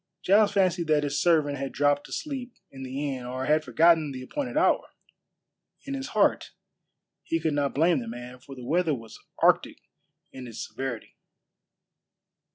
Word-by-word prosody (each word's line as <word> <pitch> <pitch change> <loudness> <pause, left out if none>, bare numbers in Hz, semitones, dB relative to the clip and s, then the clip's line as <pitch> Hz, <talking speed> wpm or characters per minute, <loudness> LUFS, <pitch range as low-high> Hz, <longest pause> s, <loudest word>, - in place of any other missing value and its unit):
Giles 205 +2 +5
fancied 185 -4 +1
that 150 -1 +3
his 145 0 -1
servant 150 -5 +2
had 135 0 -3
dropped 145 0 +1
asleep 265 -5 -5 0.2
in 135 - -10
the 135 +2 -3
inn 125 - -7
or 130 +2 -4
had 155 +2 +3
forgotten 160 -2 +4
the 130 -1 -7
appointed 275 - -4
hour. 320 - +2 1.0
In 275 - -4
his 270 0 -4
heart - - +2 0.7
he 165 - -1
could 160 -1 0
not 145 -1 0
blame 165 +2 +3
the 115 - -7
man, 120 +2 -8
for 135 +2 -12
the 125 -2 -9
weather 165 +1 +1
was 115 -3 -11 0.2
arctic - - +3 0.5
in 130 -1 -9
its 115 - -6
severity. 130 -4 -6
145 Hz, 165 wpm, -27 LUFS, 130-175 Hz, 1.0 s, Giles